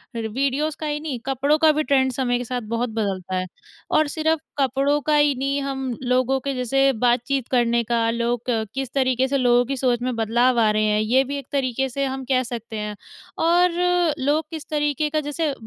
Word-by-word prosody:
रि 225 -1 -2
वीडियोज़ 275 +6 -1
का 310 - -4
ही 295 0 -2
नहीं, 295 -5 -4
कपड़ों 275 +3 +1
का 315 0 +5
भी 305 +1 0
ट्रेंड 265 -3 +2
समय 245 -1 0
के 245 - -4
साथ 250 +1 -3
बहुत 235 +1 -1
बदलता 190 -4 -2
है। 185 0 -1 0.5
और 310 -1 +3
सिर्फ़ 315 +1 0 0.2
कपड़ों 275 +2 +2
का 300 +1 +1
ही 295 -1 +3
नहीं 275 +2 -1
हम 270 -2 -3
लोगों 255 +1 +1
के 275 +1 -3
जैसे 270 +2 +2
बातचीत 245 +2 +1
करने 235 -2 +2
का, 230 0 0
लोग 235 0 -1 0.3
किस 270 -2 -4
तरीके 260 -1 +1
से 275 +1 0
लोगों 245 -1 +3
की 270 +2 -3
सोच 245 -2 +1
में 250 0 -2
बदलाव 235 +2 +2
आ 220 -2 +4
रहे 215 0 +1
हैं, 210 0 +2
ये 245 +5 +3
भी 280 +2 -4
एक 275 - -8
तरीके 265 -1 -1
से 275 +2 -2
हम 265 0 -4
कह 255 0 +3
सकते 230 -2 -6
हैं। 210 0 -4 0.5
और 350 +2 +4 0.5
लोग 290 +4 +1
किस 320 -3 -8
तरीके 295 0 0
का 310 +1 0
जैसे 300 0 -1
260 Hz, 210 wpm, -22 LUFS, 240-280 Hz, 0.5 s, का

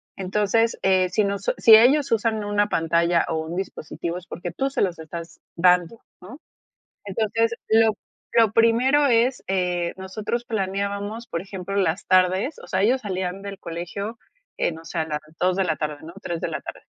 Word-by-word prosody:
Entonces, 210 +4 +1
eh, 185 -1 +3
si 215 +3 +1
nos 200 0 -1
si 220 -1 +8
ellos 270 +5 +5
usan 220 -1 +1
una 205 0 +1
pantalla, 170 +1 +2
o 165 - -2
un 170 +2 -6
dispositivo 175 -2 -5
es 180 - -10
porque 175 +1 -6
tú 270 0 -1
se - - -2
los 180 -4 0
estás 165 +1 -9
dando, 180 +4 +3 0.2
¿no?, 235 +11 -11 0.7
entonces, 225 +3 0
lo 220 0 +5 0.4
lo 225 -2 +5
primero 250 +6 +4
es 245 +1 +2
eh, 180 -2 -1
nosotros 215 +5 -4
planeábamos, 200 +2 -3
por 165 - -3
ejemplo, 195 0 -6
las 185 -2 0
tardes, 185 - +2
o - - -11
sea, 185 +1 0
ellos 250 +5 +3
salían 190 -2 -3
del 200 -1 -7
colegio, 200 +7 -6 0.4
eh, - - +1
no 165 0 -10
sé, 165 - -5
a 160 - 0
las 150 0 -2 0.2
2 185 +1 +2
de 195 - +2
la 160 -3 0
tarde, 150 -1 -3
¿no?, 165 +2 -9
3 170 -1 -4
de - - -1
la - - -4
tarde. - - -9
195 Hz, 185 wpm, -23 LUFS, 175-225 Hz, 0.7 s, si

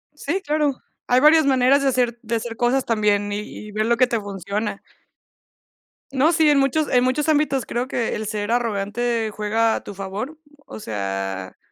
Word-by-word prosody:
Sí, 320 +6 -2
claro, 300 -2 +1 0.3
hay 250 +1 +4
varias 310 0 +6
maneras 265 +1 +4
de 275 - +1
hacer 240 -2 0
de 230 0 -2
hacer 230 0 -4
cosas 250 +3 +1
también 205 -2 +1
y 205 - -2
y 210 0 -9
ver 215 +1 -1
lo 235 0 +2
que 255 - +5
te 235 -2 -1
funciona. 200 +1 -4 1.3
No, 280 +5 +3
sí, 315 -2 +4
en 285 -1 +4
muchos 285 +3 +1
en 250 -1 +3
muchos 260 +4 0
ámbitos 290 -4 +1
creo 245 +2 -2
que 235 -4 -2
el 215 - -4
ser 210 0 -3
arrogante 230 0 -1
juega 220 +2 +1
a - - -5
tu 205 - -9
favor, 200 +10 -5 0.3
o - - -8
sea, 95 - -4
235 Hz, 185 wpm, -22 LUFS, 210-270 Hz, 1.3 s, varias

